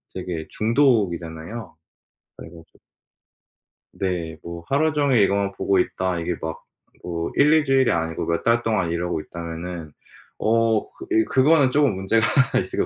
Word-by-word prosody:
되게 85 -4 -5
중독이잖아요. 110 - 0 0.6
그래 - - -9
가지고 80 -1 -17 1.1
네. 85 -4 -3
뭐 85 0 -8
하루 155 +3 +1
종일 140 -6 +3
이거만 100 0 +1
보고 95 -1 +1
있다. 90 -1 -1
이게 85 +1 -2
막 80 0 -5 0.4
뭐 85 -1 -4
1-2 150 +2 +5
주일이 135 -2 +3
아니고 80 -1 -2
몇 85 0 -1
달 115 0 +3
동안 100 -8 0
이러고 85 -1 -2
있다면은 85 -1 -7 0.5
어 115 0 +2
그 360 - -12
예 335 -1 +4
그거는 140 - +3
쪼금 140 -8 +2
문제가 100 +4 +1 0.4
있을 - - -8
것 - - +2
95 Hz, 285 characters per minute, -23 LUFS, 85-125 Hz, 1.1 s, 1-2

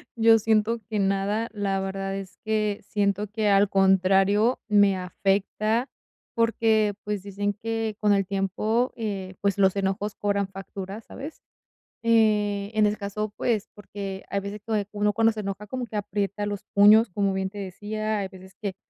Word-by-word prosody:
yo 225 -1 +6
siento 220 +1 +2
que 215 -2 -1
nada, 195 +3 0
la 200 -2 -1
verdad 195 0 -3
es 195 -1 -7
que 215 -1 0
siento 200 0 -1
que, 210 0 0
al 200 0 +4
contrario, 195 +4 +3
me 205 -2 +5
afecta, 200 +6 0 0.4
porque, 225 -2 +2
pues, 205 -2 -3
dicen 205 +1 -2
que 225 -1 -2
con 210 -1 +3
el 195 -1 +2
tiempo, 200 +6 0
eh, 195 -4 -4
pues, 200 -1 +1
los 190 -1 +3
enojos 195 +1 -1
cobran 200 -1 0
factura, 195 +1 -7
¿sabes?, 285 +7 -9 0.7
eh, 210 -3 +3
en 215 - +5
ese 210 +1 +1
caso, 205 +1 -4
pues, 225 -3 0
porque 195 -1 -7
hay 200 - 0
veces 200 +1 -6
que 210 -3 0
uno 210 0 +1
cuando 225 +1 +3
se 215 - -6
enoja, 200 0 -4
como 245 +3 -4
que 220 - -9
aprieta 205 0 -2
los 205 -1 -4
puños, 210 +3 +7
como 195 +1 0
bien 190 0 -1
te 205 - -12
decía, 210 +2 -3
hay 195 - -2
veces 190 0 -14
que 200 -3 -3
205 Hz, 170 wpm, -25 LUFS, 195-215 Hz, 0.7 s, puños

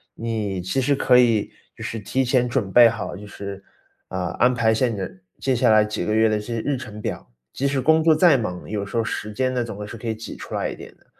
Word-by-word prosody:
你 105 -5 -3
其 95 +9 -1
实 140 +2 +2
可 125 -2 +4
以 115 -4 +3 0.2
就 - - -9
是 115 - -4
提 130 +6 -1
前 125 0 +2
准 120 -6 -1
备 120 +3 +8
好， 115 -2 -5
就 105 - -9
是， 100 -1 -8 0.5
呃， 90 -1 -2
安 125 +1 +3
排 115 -2 +2
下 125 +3 +2
你 115 - -3 0.4
接 130 -1 +1
下 115 - +3
来 110 0 +6
几 105 - -3
个 105 - 0
月 110 +1 +4
的 110 -1 +1
这 115 +3 -5
日 135 +5 -1
程 110 -5 -8
表， - - -5 0.2
即 140 - -1
使 140 -1 0
工 160 +4 +3
作 160 0 +6
再 155 -3 +5
忙， 90 -6 -5
有 105 -2 -2
时 100 +4 -5
候 115 - +2
时 105 -1 -4
间 130 +4 -1
呢， 125 -1 0
总 110 -4 -7
会 105 0 -6
是 115 - -8
可 115 +1 -5
以 110 - -1
挤 110 - -8
出 - - -9
来 - - -1
一 - - -6
点 - - -12
的。 - - -30
115 Hz, 285 characters per minute, -23 LUFS, 105-125 Hz, 0.5 s, 备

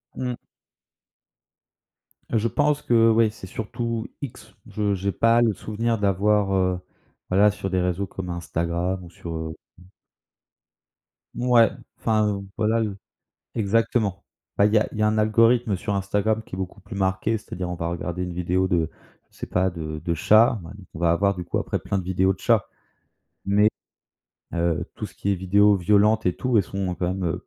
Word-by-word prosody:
Mmh. 125 -1 -3 1.9
Je 115 0 +1
pense 150 +3 +1
que 115 -3 +4
ouais, 115 0 +4
c'est 105 -4 -11
surtout 115 +2 -4
X. 140 - -8
Je 105 -1 -1
j'ai 100 +1 -1
pas 115 +3 +3
le 115 -3 +3
souvenir 115 +4 -2
d'avoir, 100 0 +2
heu, 95 -1 +1 0.5
voilà, 100 +3 +5
sur 95 -1 -5
des 95 -1 +1
réseaux 90 +2 -1
comme 90 0 -7
Instagram 85 +2 -2
ou 85 - -11
sur 85 0 -8
heu 80 0 -4 0.3
mmh. - - -16 1.5
Mouais, 120 -3 +4 0.3
enfin, 105 -3 +1
voilà 110 +1 +2
le 105 -3 -3 0.6
exactement. 110 -2 0 0.3
Bah 100 - +6
il 105 - +1
y - - +7
a 105 - 0
il - - -7
y - - +1
a - - +4
un 110 0 +1
algorithme 115 0 +3
sur 100 +2 -3
Instagram 105 +3 0
qui 90 - -8
est - - -8
beaucoup 95 -1 -5
plus 100 +2 -9
marqué. 95 +3 0
C'est-à-dire, 90 -3 -6
on - - -2
va 85 0 -3
regarder 85 +1 -3
une 90 - -5
vidéo 90 +2 0
de, 85 -4 +1 0.4
je - - -24
sais - - -6
pas, 95 +1 +1
de 80 -3 -6
de 85 - 0
chat. 110 +8 +4
Ben, 85 - -9 0.2
on - - -7
va 85 0 +3
avoir, 100 +3 +2
du 90 - -5
coup, - - -2
après, - - -2
plein 100 - -2
de 95 - -4
vidéos 95 +1 +2
de - - -12
chats. 115 -5 +2 0.8
Mais 105 +2 +4 0.8
heu, 85 -2 0
tout - - -5
ce - - -17
qui 100 - -1
est - - +2
vidéos 100 +3 +4
violentes 105 +3 +3
et 90 - +2
tout, 125 -2 0
elles - - +4
sont 95 0 -3
quand 90 - -2
même, 95 +1 -2
heu, 90 +1 -3
100 Hz, 190 wpm, -24 LUFS, 90-110 Hz, 1.9 s, y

